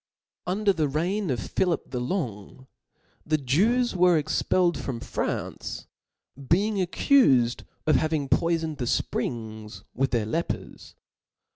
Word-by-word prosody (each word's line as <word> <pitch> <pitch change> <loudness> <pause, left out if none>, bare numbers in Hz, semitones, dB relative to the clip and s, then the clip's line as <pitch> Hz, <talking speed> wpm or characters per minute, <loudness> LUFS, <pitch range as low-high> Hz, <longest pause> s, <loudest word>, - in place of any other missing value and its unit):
Under 200 +2 +2
the 155 -4 0
reign 175 +7 -1
of 125 -3 0
Philip 180 -3 0
the 125 - -2
Longy 125 - -4 0.6
the 155 0 +1
Jews 205 - +2
were 180 -2 +5
expelled 170 +3 +1
from 125 -4 -4
France, - - -4 0.6
being 205 +4 +2
accufed 140 - +3 0.2
of 155 -3 +4
hav 155 +3 0
ing 150 -3 0
poifoned 165 0 0
the 125 - -1
fprings 110 -2 -3
with 135 +2 0
their 115 -3 0
lepers. 165 +10 -4
155 Hz, 125 wpm, -26 LUFS, 125-180 Hz, 0.6 s, were